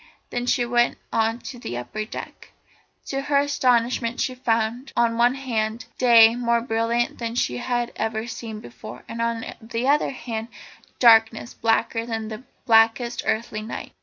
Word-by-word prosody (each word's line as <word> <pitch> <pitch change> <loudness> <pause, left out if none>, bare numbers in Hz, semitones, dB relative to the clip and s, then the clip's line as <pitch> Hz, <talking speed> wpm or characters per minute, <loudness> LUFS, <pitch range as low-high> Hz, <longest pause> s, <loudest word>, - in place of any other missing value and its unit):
Then 245 0 -3
she 245 -1 +2
went 240 0 +2 0.2
on 225 +1 +1
to 245 - -8
the 120 - -5
upper 215 +13 -5
deck. - - -9 0.5
To 275 0 -3
her 285 0 +1
astonishment 250 -4 +1
she 255 - 0
found, 235 +1 -1
on 235 -1 +3
one 240 +2 +3
hand, 225 -4 -2
day 230 -3 +7
more 235 -1 +1
brilliant 230 0 -1
than 230 -1 -4
she 125 - 0
had 240 - -2
ever 220 0 -2
seen 230 -2 -7
it - - -10
before, - - -10
and 230 0 -5
on 230 -1 -1 0.2
the 230 +3 -3
other 290 +2 +3
hand 230 -4 -5 0.5
darkness 225 0 +5
blacker 225 0 0
than 225 -2 -3
the 220 +1 -7 0.2
blackest 230 +1 +3
earthly 220 -1 -1
night. 220 - -7
235 Hz, 165 wpm, -23 LUFS, 225-245 Hz, 0.5 s, day